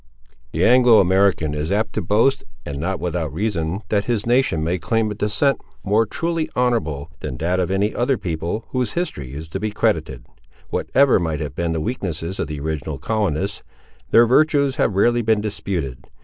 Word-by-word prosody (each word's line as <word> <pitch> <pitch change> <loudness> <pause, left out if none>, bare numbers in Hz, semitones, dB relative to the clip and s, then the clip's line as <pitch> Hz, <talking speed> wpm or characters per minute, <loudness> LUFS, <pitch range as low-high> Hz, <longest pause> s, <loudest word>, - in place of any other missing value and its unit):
The - - +1
Anglo 125 -2 +6
American 95 -4 +2
is 75 +3 -3
apt 105 +3 0
to 110 - -1
boast, 110 +9 +2 0.2
and 70 -1 -5
not 90 +4 -2
without 85 -4 -2
reason, 95 0 -2
that 100 -1 +1
his 115 -3 -1
nation 120 -10 +2
may 90 +3 -1
claim 110 +7 0
a - - -2
descent 105 +6 +1 0.2
more 105 +3 +2
truly 165 +4 -2
honourable 80 - 0
than 65 - -5
that 90 +6 0
of 90 - 0
any 100 +3 +1
other 125 +2 +1
people 85 +5 -3
whose 125 -2 -1
history 70 - -3
is 80 +2 -7
to 95 - -4
be 110 +1 -1
credited. 105 - -1 0.5
Whatever 140 -5 +3
might 80 -4 -2
have 75 -2 -4
been 85 +2 -1
the 80 - -1
weaknesses 90 -4 -3
of - - -1
the 75 -1 -5
original 80 0 -3
colonists, 100 - -1 0.5
their 115 - +6
virtues 140 +1 +3
have 105 - +1
rarely 120 +4 +3
been 110 -1 +2
disputed. 90 - -4
100 Hz, 180 wpm, -21 LUFS, 80-115 Hz, 0.5 s, Anglo